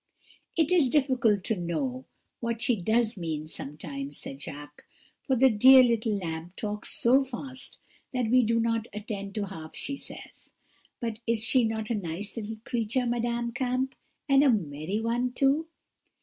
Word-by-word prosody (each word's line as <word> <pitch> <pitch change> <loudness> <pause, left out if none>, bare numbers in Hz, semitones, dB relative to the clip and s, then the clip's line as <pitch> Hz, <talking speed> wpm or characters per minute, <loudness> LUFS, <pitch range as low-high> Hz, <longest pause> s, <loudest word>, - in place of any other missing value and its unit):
"'It 325 0 +3
is 330 -8 +5
difficult 245 -8 +2
to 220 - 0
know 250 - -3 0.3
what 235 -1 -2
she 245 0 +2
does 220 +3 +1
mean 160 -3 -3
sometimes,' 140 -2 -6
said 135 +1 -7
Jacques; 145 -1 -9 0.4
'for 265 - 0
the 265 +2 +6
dear 255 +5 +8
little 225 -3 +1
lamb 165 -2 -5
talks 210 -1 -3
so 260 +4 +5
fast 260 +1 -5 0.3
that 250 -4 -1
we 255 0 +6
do 230 0 +2
not 230 0 0
attend 200 -2 -5
to 210 -2 -1
half 160 -5 -9
she 280 - -2
says. - - -10 0.5
But 230 -2 -3
is 230 -1 +2
she 255 +1 +3
not 220 0 -2
a - - +3
nice 200 0 -3
little 220 -1 -5
creature, 240 +2 0
Madame 235 0 -1
Kamp, 255 +1 -1 0.3
and 275 0 +5
a 285 - +5
merry 170 - -1
one 240 +2 0
too?' 280 +5 +2
230 Hz, 165 wpm, -28 LUFS, 200-255 Hz, 0.5 s, dear